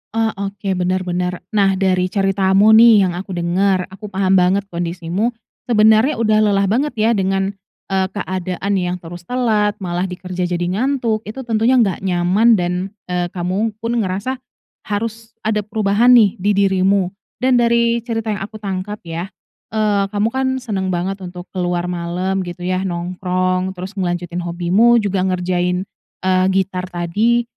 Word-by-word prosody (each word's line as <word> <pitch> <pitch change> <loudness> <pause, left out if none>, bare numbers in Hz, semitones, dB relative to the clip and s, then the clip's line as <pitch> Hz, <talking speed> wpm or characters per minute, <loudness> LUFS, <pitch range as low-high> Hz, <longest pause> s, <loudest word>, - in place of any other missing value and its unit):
Ah, 225 -1 +1
oke, 200 0 -3
benar 185 0 0
benar. 180 0 -3
Nah, 195 -2 +3
dari 185 -1 +1
ceritamu 195 +1 +3
nih, 220 -2 +7
yang 180 - +1
aku 185 +1 -6
dengar, 185 +2 +1
aku 210 +2 -9
paham 190 -1 +2
banget 185 +3 +2
kondisimu, 175 +6 -2 0.3
sebenarnya 220 +4 +4
udah 215 -2 +2
lelah 200 -1 +2
banget 270 +8 0
ya, 225 +1 +2
dengan, 195 -1 0 0.4
eee, 190 -1 +1
keadaan 185 0 -3
yang 180 0 -1
terus 175 +1 -10
telat, 220 -5 +1
malah 175 +1 -1
di 180 - -6
kerja, 180 0 -4
jadi 175 0 -2
ngantuk. 225 +3 -1
Itu, 260 +5 -6
tentunya 230 +2 +2
nggak 215 -8 +2
nyaman, 180 +5 +2
dan, 175 -1 -1 0.4
eee, 180 0 0
kamu 190 +5 -1
pun 235 +1 0
ngerasa, 200 +7 -2 0.5
harus 225 +2 -4
ada 215 -1 +1
perubahan 210 +3 +3
nih, 210 -6 +4
di 200 +3 +1
dirimu, 190 -1 +2 0.3
dan 255 -1 +4
dari 235 0 +3
cerita 225 -2 -3
yang 205 - -3
aku 205 +3 -7
tangkap, 195 +1 -4
ya, 170 +2 -5 0.5
eee, 205 -2 +2
kamu 205 +2 0
kan, 265 0 0 0.2
senang 195 -6 -2
banget 185 +2 -2
untuk 180 -1 -9
keluar 175 -2 -1
malam 180 +2 -2
gitu, 175 0 -7
ya, 185 +1 0
nongkrong, 185 +1 -1
terus 185 +2 -6
ngelanjutin 175 -3 -3
hobimu, 180 +7 +3
juga 195 -1 0
ngerjain, 180 0 0 0.4
eee, 185 0 +3
gitar 185 -1 -1
tadi, 210 +8 +1
195 Hz, 155 wpm, -18 LUFS, 180-215 Hz, 0.5 s, nih